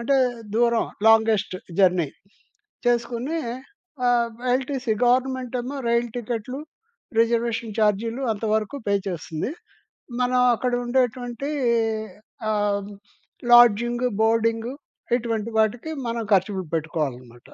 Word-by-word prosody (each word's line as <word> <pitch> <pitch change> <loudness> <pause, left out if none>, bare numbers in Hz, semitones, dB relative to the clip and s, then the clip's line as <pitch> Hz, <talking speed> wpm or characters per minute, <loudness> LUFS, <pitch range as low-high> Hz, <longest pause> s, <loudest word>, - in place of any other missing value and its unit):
అంటే 260 +4 +1 0.4
దూరం 235 0 +3 0.2
longest 220 -3 +4 0.2
journey 180 -5 +4 0.8
చేసుకొని 240 +5 0 0.7
ఆహ్, 235 -1 +3 0.2
ఎల్‌టిసీ 260 -2 -1
గవర్నమెంటేమో 255 +1 0
రైలు 235 0 +2
టికెట్లు 240 +2 -4 0.6
రిజర్వేషన్ 230 -1 +1
ఛార్జీలు 225 +4 +1
అంతవరకు 215 +3 -1
పే 200 - +2
చేస్తుంది. 165 - -4 0.7
మనం 250 0 +2
అక్కడ 250 +2 -2
ఉండేటువంటి 245 +1 -1 1.0
ఆహ్, 205 -1 0 0.6
లాడ్జింగు, 240 +1 +6
బోర్డింగు 230 +2 +2 0.4
ఇటువంటి 230 -2 -2
వాటికి 230 +8 +1 0.2
మనం 230 0 -2
ఖర్చులు 190 0 +2
పెట్టుకోవాలనమాట 135 -7 -4
230 Hz, 90 wpm, -24 LUFS, 210-245 Hz, 1.0 s, లాడ్జింగు